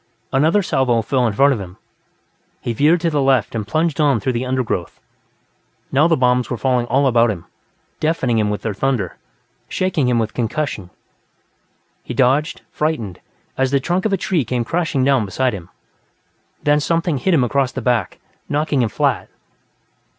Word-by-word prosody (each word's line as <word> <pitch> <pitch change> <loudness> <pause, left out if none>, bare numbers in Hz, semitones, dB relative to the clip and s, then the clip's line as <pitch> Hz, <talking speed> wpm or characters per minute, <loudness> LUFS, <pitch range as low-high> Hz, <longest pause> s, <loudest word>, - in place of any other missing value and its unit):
Another 160 +9 +3
salvo 125 -7 +1
fell 125 +2 +1
in 110 - -1
front 140 +5 +4
of 120 - -4
him; 90 -1 -10 0.8
he 120 - -3
veered 155 +8 +3
to 170 - +1
the 145 -2 +1
left 135 -4 +2
and 110 -3 -3
plunged 155 +1 0
on 140 -6 +3
through 125 +5 -1
the 120 +2 -2
undergrowth. 125 -9 -2 0.9
Now 145 +4 +4
the 165 -2 +2
bombs 125 -1 +2
were 125 - -2
falling 125 -1 0
all 135 +4 +2
about 120 -2 +4
him, 95 -6 -4 0.5
deafening 135 -7 +1
him 105 -1 +1
with 105 -1 -3
their 110 - -2
thunder, 110 -4 -1 0.5
shaking 180 -8 0
him 120 - +2
with 110 -2 -1
concussion. 120 - -3 1.1
He - - -6
dodged, 135 +3 +2
frightened, 145 - -2 0.4
as 130 0 +2
the 140 +1 +2
trunk 175 +8 -1
of 215 - +1
a 195 - +2
tree 175 -4 0
came 120 0 -2
crashing 165 -3 0
down 135 -3 +3
beside 125 +5 -1
him. 90 -4 -8 0.9
Then 145 0 +3
something 165 -1 0
hit 185 +5 +2
him 135 - +3
across 130 +1 +1
the - - -4
back, 120 -8 0 0.3
knocking 145 -2 +1
him 115 - +1
flat. - - 0
130 Hz, 175 wpm, -19 LUFS, 115-150 Hz, 1.1 s, front